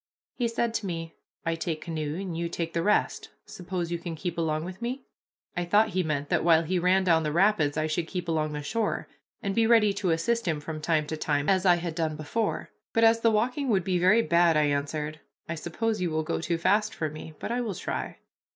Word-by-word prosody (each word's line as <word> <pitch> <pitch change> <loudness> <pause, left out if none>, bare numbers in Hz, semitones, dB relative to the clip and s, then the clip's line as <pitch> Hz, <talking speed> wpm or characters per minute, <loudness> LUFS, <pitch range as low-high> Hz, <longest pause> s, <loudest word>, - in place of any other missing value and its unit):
He 240 - 0
said 230 0 -1
to 215 -3 -2
me, 165 -2 -4 0.3
"I 165 - +1
take 165 -1 -3
canoe 155 -2 -3
and 190 -4 -4
you 170 0 -2
take 165 -1 -3
the 170 - 0
rest, 210 +4 +1 0.2
suppose 175 -1 -4
you 170 - -1
can 170 -1 -5
keep 175 +1 -4
along 160 -1 -1
with 185 +3 -8
me?" 255 +3 -3 0.5
I 180 - 0
thought 210 +5 +3
he 185 - 0
meant 145 -4 -2
that - - +2
while 165 -1 +5
he 180 +3 0
ran 185 +2 +3
down 165 -3 +4
the 155 -1 -1
rapids 170 -4 +3
I 155 - +1
should 160 +1 -1
keep 180 -1 -4
along 155 -2 0
the 150 0 -4
shore, 220 +8 -1 0.4
and 200 - -1
be 225 +2 +3
ready 220 -3 +5
to 200 -2 -1
assist 210 +7 0
him 155 -3 0
from 155 +1 -6
time 155 -1 +1
to 155 +1 -4
time, 145 -1 0
as 190 -1 +3
I 175 - +7
had 170 -1 -3
done 160 -2 -1
before; 180 +9 -2 0.2
but 225 - +3
as 225 0 +6
the 230 - +4
walking 250 +6 0
would 195 -5 +2
be 180 0 0
very 200 +6 +5
bad, 170 -3 +4
I 150 - +4
answered, 150 +1 -1 0.3
"I 170 - -2
suppose 215 +6 -2
you 180 - +1
will 160 0 -1
go 155 - -2
too 170 0 -1
fast 205 +5 +2
for 155 - -1
me, 155 0 -9
but - - -5
I 245 +1 0
will 215 -6 -3
try." - - -4
170 Hz, 240 wpm, -27 LUFS, 155-205 Hz, 0.5 s, I